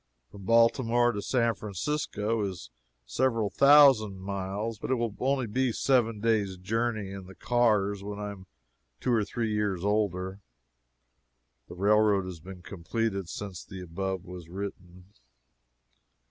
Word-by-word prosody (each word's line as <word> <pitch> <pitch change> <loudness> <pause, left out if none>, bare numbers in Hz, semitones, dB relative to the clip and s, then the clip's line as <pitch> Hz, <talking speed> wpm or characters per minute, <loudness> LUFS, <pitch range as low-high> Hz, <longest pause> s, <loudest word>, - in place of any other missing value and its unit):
From 100 -2 -11
Baltimore 115 +2 +4
to 105 -3 -4
San 115 0 +1
Francisco 110 - -2
is 95 -3 -6 0.3
several 115 - 0
thousand 135 -9 +6
miles, 100 +3 -4
but - - -5
it 130 - +3
will 120 -2 -1
be - - -18
only 130 -2 +1
a - - -1
seven 115 -5 +2
days' 105 -4 0
journey 110 +1 -2
in 95 -1 -8
the 95 - -12
cars 105 -5 +1
when 100 0 -6
I 105 0 -4
am 95 -2 -12 0.5
two 125 - 0
or 110 -2 +3
three 110 +1 -2
years 100 -3 -1
older. 95 -2 -1 1.3
[The - - -10
railroad 105 0 +3
has 90 -3 -7
been 90 +2 -11
completed 100 +1 -3
since 95 -2 -6
the 95 -1 -9
above 95 +2 -4
was 90 -2 -10
written. 90 0 -8
105 Hz, 145 wpm, -28 LUFS, 95-115 Hz, 1.3 s, thousand